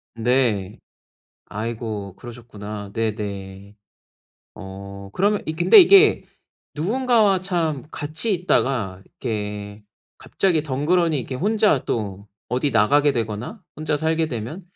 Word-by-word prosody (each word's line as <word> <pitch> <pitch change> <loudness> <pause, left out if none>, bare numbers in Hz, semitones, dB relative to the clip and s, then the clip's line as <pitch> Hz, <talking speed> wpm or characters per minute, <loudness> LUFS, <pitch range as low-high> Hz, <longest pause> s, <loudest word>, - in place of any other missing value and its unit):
네. 115 -5 0 0.7
아이고. 110 -2 -5
그러셨구나. 105 -4 -9
네네. 100 -3 -4 0.8
어. 100 0 -9
그러면 205 +2 +1
이 155 - -3
근데 175 - +6
이게 395 +3 +6 0.5
누군가와 215 - +2
참 165 -8 -1
같이 155 +9 -2
있다가 125 - 0
이렇게 105 -2 -5 0.4
갑자기 175 -6 0
덩그러니 155 +3 +1
이렇게 130 +1 -5
혼자 205 - +2
또 100 -3 -4 0.2
어디 130 +3 0
나가게 140 +7 +3
되거나 115 - -4
혼자 155 -1 -1
살게 160 +1 0
되면 125 - -6
125 Hz, 245 characters per minute, -22 LUFS, 105-165 Hz, 0.8 s, 근데